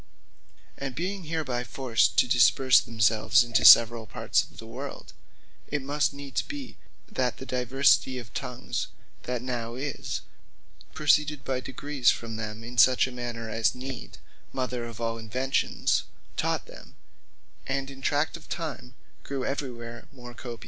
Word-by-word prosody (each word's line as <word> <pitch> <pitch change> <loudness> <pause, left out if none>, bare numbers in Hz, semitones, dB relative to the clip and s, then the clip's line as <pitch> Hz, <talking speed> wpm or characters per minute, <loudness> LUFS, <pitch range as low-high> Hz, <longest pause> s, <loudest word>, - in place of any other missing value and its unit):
And 135 -2 -4
being 185 +2 -3
hereby 150 -6 -2
forced 125 0 +1
to - - +5
disperse 125 +1 +5
themselves 110 +2 +3
into 120 -1 +1
severall 115 -1 +8
parts - - +1
of - - -12
the - - -9
world, - - -8 0.5
it 150 - -1
must 145 +2 +1
needs 140 -1 -3
be, 280 -3 -8 0.3
that 125 -2 -1
the 130 - -8
diversity 130 +1 +2
of 120 -1 -9
Tongues 125 0 -3 0.4
that 125 -1 -3
now 120 -2 -3
is, 140 +2 -4 0.7
proceeded 150 0 +2
by 130 -1 -1
degrees 135 0 0
from 115 -1 -1
them, 110 0 -5
in 120 +1 -4
such 130 +1 +6
manner, 120 -2 -5
as 110 +2 +1
need 130 0 -7
(the - - -11 0.4
mother 125 -2 -2
of 115 -1 -9
all 115 0 -2
inventions) 130 +5 0 0.3
taught - - 0
them; - - -14 0.7
and 135 0 -2
in 135 0 -12
tract 145 +5 +1
of 170 - -12
time 145 -6 -5 0.3
grew 135 -2 -4
every 135 -1 -2
where 120 0 -9
more 120 -3 -11
copious. 120 -1 -8
125 Hz, 150 wpm, -27 LUFS, 120-140 Hz, 0.7 s, severall